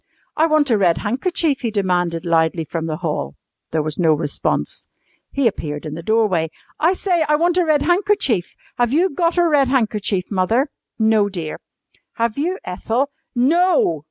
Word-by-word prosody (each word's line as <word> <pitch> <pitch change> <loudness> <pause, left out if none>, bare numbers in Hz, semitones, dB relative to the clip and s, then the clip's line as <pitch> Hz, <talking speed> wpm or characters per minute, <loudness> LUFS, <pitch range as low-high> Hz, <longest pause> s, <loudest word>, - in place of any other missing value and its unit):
"I 320 +1 +3
want 305 -4 +2
a 220 - +3
red 175 -4 +3
handkerchief," 280 - 0
he 235 - -2
demanded 180 -5 -1
loudly 165 0 +1
from 165 +2 -4
the 155 -1 -3
hall. 70 - -3 0.3
There 155 -1 -1
was 155 +2 -3
no 165 -3 +4
response. 150 -1 -2 0.4
He 275 -1 0
appeared 150 -9 -2
in 150 - -5
the 165 - -6
doorway. 190 -5 +1 0.3
"I 335 +4 +3
say, 360 -3 0
I 300 - +5
want 345 +3 +2
a 355 - +2
red 305 -2 +2
handkerchief. 350 - +1 0.2
Have 240 -1 +2
you 345 +6 +2
gotter 345 +3 +2
red 290 -4 +3
handkerchief, 215 -7 0
Mother?" 220 +9 +1 0.3
"No, 220 -2 +3
dear." 170 -5 -5 0.5
"Have 230 -2 -1
you 345 +7 -1
Ethel?" 240 +9 -1 0.2
"NO!" 300 - +3
225 Hz, 165 wpm, -20 LUFS, -, 0.5 s, I